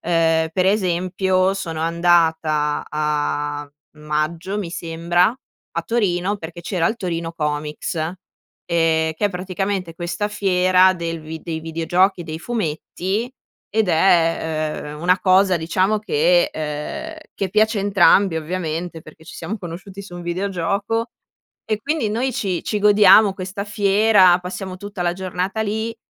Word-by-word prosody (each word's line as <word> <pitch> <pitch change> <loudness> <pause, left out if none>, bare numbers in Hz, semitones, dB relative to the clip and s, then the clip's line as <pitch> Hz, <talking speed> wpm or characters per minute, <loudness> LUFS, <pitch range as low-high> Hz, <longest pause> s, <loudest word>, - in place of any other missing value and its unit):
Ehm, 165 -1 +2
per 185 - +2
esempio 185 -1 +1
sono 165 -5 -4
andata 165 -3 +2
a 145 -1 -2 0.3
maggio 155 +6 -2
mi 185 -5 -4
sembra, 175 +6 0 0.4
a 170 - -2
Torino, 195 -1 0
perché 170 0 -8
c'era 170 -1 -1
il 225 - -3
Torino 170 -5 -3
Comics, 150 -1 -3
ehm, 160 +1 -2 1.0
che 180 - -3
è 205 - -3
praticamente 185 -1 -3
questa 175 +3 -3
fiera 185 -2 +3
del 165 -2 -4
vi 160 +1 -8
dei 160 -1 -4
videogiochi, 175 +4 +1
dei 160 -1 -6
fumetti 205 +3 -3 0.4
ed 220 -2 +1
è, 160 -3 +1
ehm, 150 - -10
una 180 +2 +2
cosa 185 0 +4
diciamo 185 +6 +1
che, - - +2
ehm, 150 - -5 0.2
che 195 - -2
piace 215 +2 +2
a - - -1
entrambi 195 -2 +4
ovviamente, 165 0 -4
perché 160 +1 -15
ci - - -11
siamo 185 +7 -4
conosciuti 190 +2 -8
su 190 -3 -11
un 175 - -7
videogioco. 200 +5 -2 0.5
E 215 -1 -2
quindi, 295 -3 -1
noi 250 +5 -1
ci 190 -6 -2
ci 210 - -1
godiamo 205 0 +6
questa 190 +1 -5
fiera, 200 -2 +4
passiamo 185 +1 -6
tutta 205 -2 -6
la 175 0 +1
giornata 190 +3 -3
lì. 220 +2 -3
180 Hz, 140 wpm, -21 LUFS, 165-200 Hz, 1.0 s, godiamo